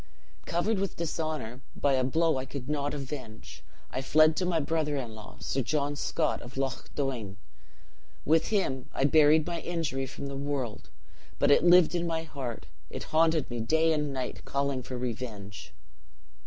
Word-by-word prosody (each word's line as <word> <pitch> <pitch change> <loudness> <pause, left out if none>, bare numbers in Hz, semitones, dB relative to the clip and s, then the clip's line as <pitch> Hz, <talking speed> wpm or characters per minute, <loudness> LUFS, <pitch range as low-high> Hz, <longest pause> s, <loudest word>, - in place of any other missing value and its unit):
"Covered 190 +5 +1
with 195 0 -2
dishonor 155 -7 -3
by 140 - +2
a 130 -1 +3
blow 160 +3 +2
I 130 - -4
could 130 -1 -6
not 145 0 -1
avenge. 130 -6 -7 0.3
I 130 - -2
fled 155 +3 +5
to 180 - +1
my 170 -2 +2
brother 155 -1 0
in 120 -5 -4
law, 110 0 -11
Sir 135 - -1
John 145 +3 0
Scott, - - 0
of 125 +3 -10
Loch 135 -2 -2
Doine. 120 -8 -2 0.9
With 160 +2 +3
him 135 - 0
I - - +1
buried 150 +2 +5
my 170 -1 -3
injury 145 -6 -2
from 135 - -7
the 140 0 -5
world; 135 -5 -3 0.5
but 145 - +4
it 145 - +6
lived 175 -1 +7
in 175 -1 0
my 165 -1 -1
heart 135 -7 -6 0.2
it - - -6
haunted 160 -2 +3
me 120 - -3
day 160 +8 +3
and 150 -2 0
night, 130 -2 -4
calling 140 -1 -1
for 125 0 -6
revenge. 115 -5 -5
140 Hz, 170 wpm, -29 LUFS, 130-160 Hz, 0.9 s, lived